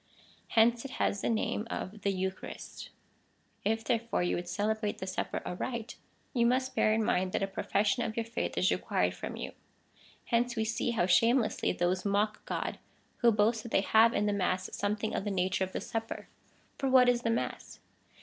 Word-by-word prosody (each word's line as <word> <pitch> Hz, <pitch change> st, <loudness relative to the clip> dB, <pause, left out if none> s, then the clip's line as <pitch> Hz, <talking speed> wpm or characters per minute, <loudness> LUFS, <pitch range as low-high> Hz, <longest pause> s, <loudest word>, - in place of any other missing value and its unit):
Hence 230 Hz, +1 st, +5 dB
it 275 Hz, -, -7 dB
has 200 Hz, -, 0 dB
the -, -, 0 dB
name 220 Hz, -1 st, -1 dB
of 205 Hz, +3 st, -5 dB
the 200 Hz, -, +1 dB
Eucharist.^ 190 Hz, 0 st, -5 dB, 0.7 s
If, 225 Hz, +2 st, 0 dB
therefore, 230 Hz, -4 st, 0 dB
you 175 Hz, -, +1 dB
would 175 Hz, 0 st, -4 dB
celebrate 210 Hz, +2 st, -1 dB
the -, -, -5 dB
Supper 185 Hz, 0 st, -3 dB
aright, 235 Hz, +5 st, -4 dB, 0.4 s
you 235 Hz, -3 st, +3 dB
must 255 Hz, +1 st, +1 dB
bear 215 Hz, -, +3 dB
in 220 Hz, +1 st, +2 dB
mind, 185 Hz, -2 st, +1 dB
that -, -, +1 dB
a -, -, +1 dB
profes, 195 Hz, +1 st, 0 dB
sion 235 Hz, +4 st, +2 dB
of 220 Hz, -, -3 dB
your 230 Hz, -, 0 dB
faith 230 Hz, +1 st, -3 dB
is -, -, +3 dB
required -, -, 0 dB
from -, -, -6 dB
you. -, -, -5 dB, 0.7 s
Hence 240 Hz, 0 st, +1 dB
we 220 Hz, -1 st, 0 dB
see 220 Hz, +2 st, -1 dB
how 225 Hz, -7 st, +1 dB
shamelessly 230 Hz, +6 st, +3 dB
those 180 Hz, +1 st, 0 dB
mock 210 Hz, +1 st, 0 dB
God, -, -, -3 dB, 0.4 s
who 235 Hz, -1 st, +5 dB
boast 220 Hz, +1 st, +2 dB
that 235 Hz, -, -9 dB
they -, -, +4 dB
have 220 Hz, +3 st, +5 dB
in 205 Hz, -, +2 dB
the 205 Hz, -, +1 dB
mass 185 Hz, -1 st, -1 dB
something 210 Hz, +1 st, -1 dB
of -, -, -1 dB
the 205 Hz, -, -2 dB
nature 190 Hz, -1 st, 0 dB
of 190 Hz, -, -4 dB
the -, -, -3 dB
Sup 225 Hz, 0 st, -3 dB
per. -, -, -7 dB, 0.5 s
For 270 Hz, -, 0 dB
what 255 Hz, -1 st, +6 dB
is 245 Hz, -1 st, +3 dB
the 230 Hz, -, 0 dB
mass 230 Hz, -, -3 dB
220 Hz, 200 wpm, -31 LUFS, 195-235 Hz, 0.7 s, what